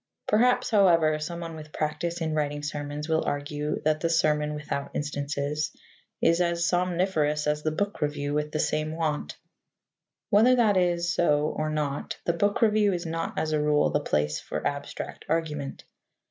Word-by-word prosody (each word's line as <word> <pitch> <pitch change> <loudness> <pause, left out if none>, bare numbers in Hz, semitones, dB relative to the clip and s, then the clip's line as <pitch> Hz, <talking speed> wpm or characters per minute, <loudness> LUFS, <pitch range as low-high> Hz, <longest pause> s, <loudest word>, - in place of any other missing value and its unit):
Perhaps, 240 +4 +3
however, 165 -7 +4
someone 165 +1 -5
with 155 -1 -10
practice 170 +3 -2
in 160 -1 -1
writing 145 -1 -1
sermons 145 0 -4
will 160 -1 +1
argue 145 +1 -2
that 155 0 +2
the 165 - 0
sermon 150 -2 +2
without 150 -1 -4
instances 145 +1 -2 0.5
is 170 +2 +4
as 170 -1 +1
somniferous 175 -4 +1
as 150 0 0
the 155 - 0
book 205 +6 -2
review 145 -1 -1
with 150 0 -1
the 155 - -2
same 155 +1 0
want. 155 - -2 0.9
Whether 230 +5 +6
that 220 -5 +3
it 175 -2 +2
so 155 -3 +2
or 155 0 -1
not, 150 -2 -2
the 170 - +2
book 205 +6 +1
review 210 -2 +4
is 175 0 -3
not, 165 0 -3
as 155 - 0
a 155 -1 +1
rule, 150 0 +3
the 145 - +2
place 75 - 0
for - - -5
abstract 145 0 -4
argument. 150 -3 -2
155 Hz, 165 wpm, -27 LUFS, 150-170 Hz, 0.9 s, Whether